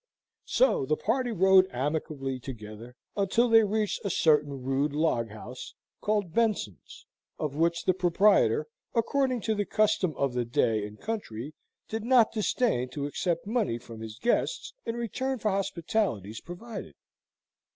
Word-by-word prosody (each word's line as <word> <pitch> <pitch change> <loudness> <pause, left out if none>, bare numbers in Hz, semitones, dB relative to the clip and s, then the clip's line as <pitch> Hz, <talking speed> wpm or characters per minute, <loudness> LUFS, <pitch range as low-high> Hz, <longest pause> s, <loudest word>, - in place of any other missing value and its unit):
So - - +3
the 155 - +1
party 245 +2 0
rode 190 -2 +5
amicably 135 0 -2
together, 115 -1 -9 0.2
until 205 +4 +2
they 225 -1 +7
reached 210 +1 -1
a 200 - -1
certain 150 -6 +2
rude 135 +3 0
log 145 -7 +1
house, 110 +4 -9 0.3
called 205 -5 0
Benson's, 215 - -1 0.3
of 150 -3 -3
which 170 +3 +1
the 185 - +4
proprietor, 195 - +3 0.3
according 255 +1 +1
to 220 - 0
the 205 -1 0
custom 200 -5 +1
of 140 -2 0
the 125 0 0
day 110 -3 +1
and 105 +1 -13
country, 155 - -5 0.3
did 220 0 -4
not 240 -2 +5
disdain 215 - 0
to 140 +1 -4
accept 170 +3 -2
money 215 - 0
from 115 -1 -11
his 110 -1 -7
guests 240 - 0
in 230 - -1
return 260 +3 -2
for 215 -2 0
hospitalities 170 - -1
provided. 205 +6 -8
175 Hz, 145 wpm, -28 LUFS, 130-220 Hz, 0.3 s, they